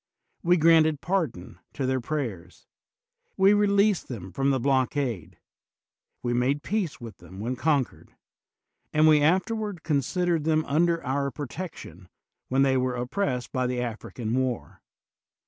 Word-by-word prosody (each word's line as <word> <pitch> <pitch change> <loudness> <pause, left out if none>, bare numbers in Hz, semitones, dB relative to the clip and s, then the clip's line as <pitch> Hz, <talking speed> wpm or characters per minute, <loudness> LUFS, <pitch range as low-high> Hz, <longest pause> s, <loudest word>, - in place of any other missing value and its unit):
We 175 +1 +3
granted 160 -2 +5
pardon 145 - -2
to 135 - -2
their 130 0 0
pray 140 -1 -2
ers; 85 -2 -16 0.7
we 195 +1 +6
released 205 -2 +3
them 95 -7 -7
from 135 +4 0
the 135 -1 +2
blockade; 130 - -1 0.9
we 120 - 0
made 135 +5 +1
peace 200 -7 -2
with 115 -3 -9
them 90 +2 -12
when 120 +5 -2
conquered; 140 -1 -1 0.8
and 155 +1 +4
we 155 -1 +6
afterward 190 +4 0
considered 165 +3 0
them 155 0 +1
under 165 +2 +1
our 140 +1 0
pro 145 +2 -6
tection 115 - -8 0.4
when 135 +1 +2
they 135 -1 +3
were 130 0 0
oppressed 125 0 -2
by 130 -1 0
the 125 0 -2
Afri 120 -2 -5
can 115 -2 -3
war. 115 - -2
140 Hz, 145 wpm, -26 LUFS, 125-165 Hz, 0.9 s, we